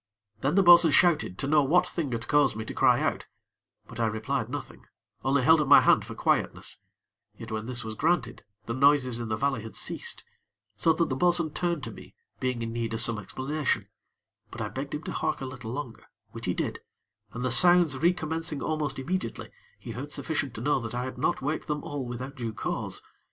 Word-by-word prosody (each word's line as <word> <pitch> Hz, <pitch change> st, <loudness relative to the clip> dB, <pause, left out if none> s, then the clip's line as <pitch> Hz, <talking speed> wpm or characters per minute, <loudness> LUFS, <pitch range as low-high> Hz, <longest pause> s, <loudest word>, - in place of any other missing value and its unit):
Then 140 Hz, +7 st, 0 dB
the 195 Hz, -, +5 dB
bo'sun 175 Hz, -1 st, +8 dB
shouted, 155 Hz, -, +3 dB
to 135 Hz, -, -2 dB
know 150 Hz, +1 st, +4 dB
what 175 Hz, +6 st, +3 dB
thing 165 Hz, -6 st, -3 dB
had 115 Hz, +1 st, -4 dB
caused 145 Hz, -6 st, +3 dB
me 110 Hz, 0 st, -5 dB
to -, -, -6 dB
cry -, -, +4 dB
out; -, -, -1 dB, 0.6 s
but 115 Hz, -, -10 dB
I 115 Hz, -, +2 dB
replied 110 Hz, +6 st, -2 dB
nothing, -, -, -7 dB, 0.4 s
only 135 Hz, +1 st, +2 dB
held 160 Hz, +3 st, +6 dB
up 145 Hz, -, -1 dB
my 140 Hz, -, +8 dB
hand -, -, +4 dB
for -, -, -8 dB
quietness, -, -, 0 dB, 0.6 s
yet 115 Hz, -1 st, -9 dB
when 110 Hz, +1 st, -4 dB
this 125 Hz, -2 st, -3 dB
was 110 Hz, -1 st, -5 dB
granted, 155 Hz, +1 st, 0 dB, 0.2 s
the 115 Hz, -, -3 dB
noises 130 Hz, -2 st, +3 dB
in 115 Hz, -2 st, -5 dB
the 110 Hz, -, 0 dB
valley 135 Hz, -2 st, 0 dB
had 110 Hz, 0 st, -9 dB
ceased; -, -, -2 dB, 0.5 s
so 165 Hz, -, +3 dB
that 165 Hz, 0 st, 0 dB
the 130 Hz, -, -1 dB
bo'sun 175 Hz, +1 st, +2 dB
turned 170 Hz, -3 st, -2 dB
to -, -, -5 dB
me, -, -, -13 dB, 0.2 s
being 125 Hz, -2 st, -2 dB
in 115 Hz, 0 st, -4 dB
need 115 Hz, -1 st, -2 dB
of 115 Hz, -, -1 dB
some 115 Hz, -2 st, +1 dB
explanation; 135 Hz, +8 st, -2 dB, 0.6 s
but -, -, -10 dB
I -, -, -3 dB
begged 140 Hz, +2 st, -5 dB
him 150 Hz, -, -6 dB
to -, -, -5 dB
hark -, -, -1 dB
a 135 Hz, -, -5 dB
little 125 Hz, -3 st, -7 dB
longer, 125 Hz, -3 st, -6 dB, 0.3 s
which -, -, -7 dB
he -, -, 0 dB
did, -, -, -3 dB, 0.5 s
and, 125 Hz, +2 st, -4 dB
the 130 Hz, -, +1 dB
sounds 175 Hz, -2 st, +6 dB
re 170 Hz, +5 st, +4 dB
commencing 160 Hz, -3 st, -2 dB
almost 150 Hz, -3 st, -2 dB
immediately, 180 Hz, +8 st, -4 dB, 0.3 s
he 120 Hz, -, -9 dB
heard 135 Hz, +6 st, -6 dB
sufficient 145 Hz, -6 st, -3 dB
to 110 Hz, -, -6 dB
know 145 Hz, +2 st, +1 dB
that 115 Hz, -1 st, -6 dB
I 125 Hz, -, -1 dB
had 130 Hz, -1 st, -6 dB
not 130 Hz, -, 0 dB
waked 150 Hz, +3 st, -2 dB
them 150 Hz, -1 st, -2 dB
all 145 Hz, -2 st, -4 dB
without 125 Hz, +2 st, -6 dB
due 115 Hz, -4 st, -4 dB
cause. -, -, -4 dB
135 Hz, 215 wpm, -27 LUFS, 120-155 Hz, 0.6 s, bo'sun